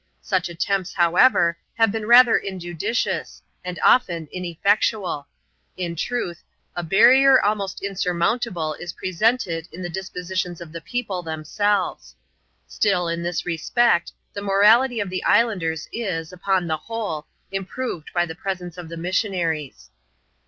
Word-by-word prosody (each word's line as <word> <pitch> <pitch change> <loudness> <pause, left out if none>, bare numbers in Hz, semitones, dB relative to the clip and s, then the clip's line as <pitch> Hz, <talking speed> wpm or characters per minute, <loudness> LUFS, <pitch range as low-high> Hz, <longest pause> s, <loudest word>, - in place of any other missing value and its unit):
Such 185 -3 0
attempts, 185 +2 -2
however, 175 -1 +4 0.2
have 225 -2 +3
been 215 0 -4
rather 240 0 +8
injudicious, 190 +4 -3 0.2
and 180 -1 -5
often 170 -10 +3
ineffectual: 180 -2 0 0.5
in 175 -2 -3
truth, 175 -2 -3 0.3
a 175 - -2
barrier 255 +10 +6
almost 200 -2 -1
insurmountable 180 -2 -1
is 175 +2 -7
pre 185 - -5
sented 180 -5 0
in 185 - -8
the 175 - -4
dispositions 180 -1 -4
of 170 -2 -10
the 165 0 -7
people 195 0 -3
themselves. 175 +5 -2 0.5
Still, 185 -4 0
in 170 0 -2
this 170 -1 -2
respect, 175 +3 +1 0.2
the 200 - -5
morality 215 +5 +4
of 200 -3 -3
the 185 - -3
islanders 165 -9 +1
is, 180 -8 -3
upon 185 0 0
the 160 -2 -1
whole, 205 -5 -5 0.2
improved 195 -2 -4
by 175 -1 +1
the 160 - -7
presence 180 -1 -5
of 170 -2 -8
the 170 - -7
missionaries. 165 - -2
180 Hz, 135 wpm, -22 LUFS, 170-210 Hz, 0.5 s, rather